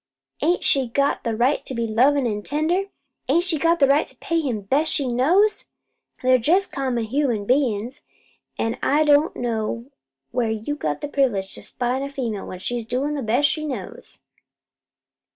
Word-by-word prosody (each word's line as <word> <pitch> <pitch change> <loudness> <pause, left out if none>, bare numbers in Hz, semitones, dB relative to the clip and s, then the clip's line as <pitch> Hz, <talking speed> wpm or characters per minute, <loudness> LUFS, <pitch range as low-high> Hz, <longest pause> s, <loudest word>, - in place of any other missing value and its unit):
Ain't 350 +2 +1
she 270 -3 +2
got 280 +4 +1
a 230 -1 0
right 250 +6 +1
to 260 - -6
be 235 0 -1
lovin' 255 +5 +3
and 210 -3 -2
tender? 315 - 0 0.4
Ain't 335 +6 +3
she 345 -4 -1
got 335 -1 +2
a - - +9
right 280 +2 +3
to - - -11
pay 335 0 -1
him 250 -9 -2
best 275 +11 +1
she 275 - 0
knows? 340 - +2 0.5
They're 255 0 +5
jest 360 - +2
common 255 -4 -1
human 235 -3 0
bein's, 250 0 0 0.6
an' 225 0 -2
I 295 +3 +3
don't 295 +1 +4
know 235 +2 -3 0.4
where 240 -2 0
you 220 +6 -3
got 155 - -3
privilege 210 -9 +1
to - - -8
spy 250 0 -2
on - - -3
a 280 - -3
female 235 -7 -4
when 185 - -7
she's 235 +4 -4
doin' 265 +5 -1
the 290 - -3
best 245 +5 +2
she 305 +1 -2
knows." 255 -11 -7
260 Hz, 180 wpm, -23 LUFS, 230-295 Hz, 0.6 s, a